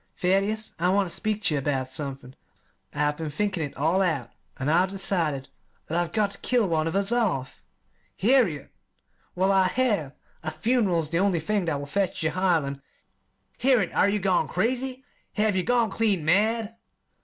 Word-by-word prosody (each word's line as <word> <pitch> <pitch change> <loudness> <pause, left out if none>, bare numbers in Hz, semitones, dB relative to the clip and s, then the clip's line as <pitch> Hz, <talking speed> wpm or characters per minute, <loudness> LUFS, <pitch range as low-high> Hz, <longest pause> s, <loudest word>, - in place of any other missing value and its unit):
"Thaddeus, 200 +3 0
I 180 +2 +2
want 195 0 +2
ter - - -9
speak 215 -1 -2
ter 180 - +2
you 145 - +1
about 135 -2 -1
somethin'. 135 -1 -5 0.6
I've 150 0 0
been 160 -2 -4
thinkin' 190 +3 -2
it 145 -3 -5
all 165 +7 +2
out, 160 -10 -1 0.3
an' 135 - -3
I've 175 +5 +3
decided 170 -8 -1 0.4
that 165 - -4
I've 175 -1 0
got 210 -1 +1
ter 200 - -9
kill 245 -5 +2
one 160 -2 0
of 165 - -3
us 200 +2 +2
off." 185 - -1 0.6
"Harriet!" 205 - +2 0.6
"Well, 190 +2 +2
I 190 -1 +4
have. 205 - 0 0.3
A 155 - -3
fun'ral 215 -4 +1
is 155 0 -7
the 170 - +1
only 190 -3 +2
thing 200 +4 -1
that 160 -4 -1
will 140 - -5
fetch 195 +6 -1
Jehiel 170 -1 +1
and 140 0 -6 0.4
" - - -43
"Harriet, 245 -8 +3
are 200 - +3
ye 205 - +1
gone 190 -3 +1
crazy? 255 +6 -1 0.3
Have 210 -2 +1
ye 185 - +2
gone 235 0 +1
clean 200 -8 0
mad?" 220 +5 +1
185 Hz, 185 wpm, -26 LUFS, 155-210 Hz, 0.6 s, I